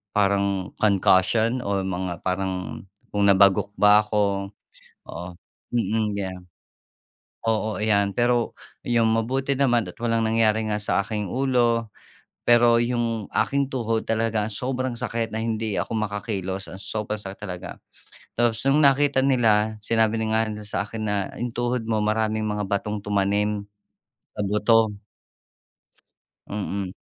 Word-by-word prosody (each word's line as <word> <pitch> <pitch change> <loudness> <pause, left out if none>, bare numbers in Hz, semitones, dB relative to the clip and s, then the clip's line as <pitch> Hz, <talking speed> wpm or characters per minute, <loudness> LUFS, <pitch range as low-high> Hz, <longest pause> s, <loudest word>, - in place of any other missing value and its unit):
parang 100 -2 +1
concussion 110 +4 +3
o 100 -1 -1
mga 90 -2 -4
parang 95 0 -2 0.3
kung 100 -1 +2
nabagok 100 0 +4
ba 105 0 +6
ko, 100 -2 0 0.6
o - - -9 0.6
mm, 110 -2 0
yeah. 95 -2 -3 1.1
Oo, 110 -1 0
iyan. 100 -2 +1
Pero 120 -1 +1 0.3
iyon, 120 -1 +3
mabuti 130 +5 0
naman, 120 -4 +2
at 90 - -10
walang 115 -1 +1
nangyari 110 -1 +2
nga 105 0 -1
sa 105 -1 0
aking 105 -1 -3
ulo. 120 -4 +1 0.5
Pero 120 0 +5
‘yong 120 -3 -1
aking 140 -1 +1
tuhod 115 -3 -1
talaga 110 -1 0
sobrang 130 +3 -2
sakit, 115 -1 -2
na 110 - -2
hindi 110 -2 -2
ako - - -3
makakilos, 100 -2 -3
ang 95 +1 -9
sobrang 105 -1 -4
sakit 95 -1 -8
talaga. 90 -3 -7 0.6
Tas 115 -2 +2
no’ng 145 +3 +4
nakita 140 -1 +4
nila, 110 -5 +2
sinabi 110 0 +1
na - - 0
nga 110 - +3
rin - - -4
nila 105 - -8
sa 100 - -1
akin 110 +1 -6
na, 105 - 0 0.2
‘yong 120 -1 -3
tuhod 120 0 -1
mo 110 -1 +1
maraming 110 0 0
mga 105 -1 -2
batong 105 +1 -2
tumanim, 105 +1 0 0.7
sa - - -1
buto. 105 +2 +3 1.6
Mm. 100 -2 -4
110 Hz, 135 wpm, -24 LUFS, 100-115 Hz, 1.6 s, ba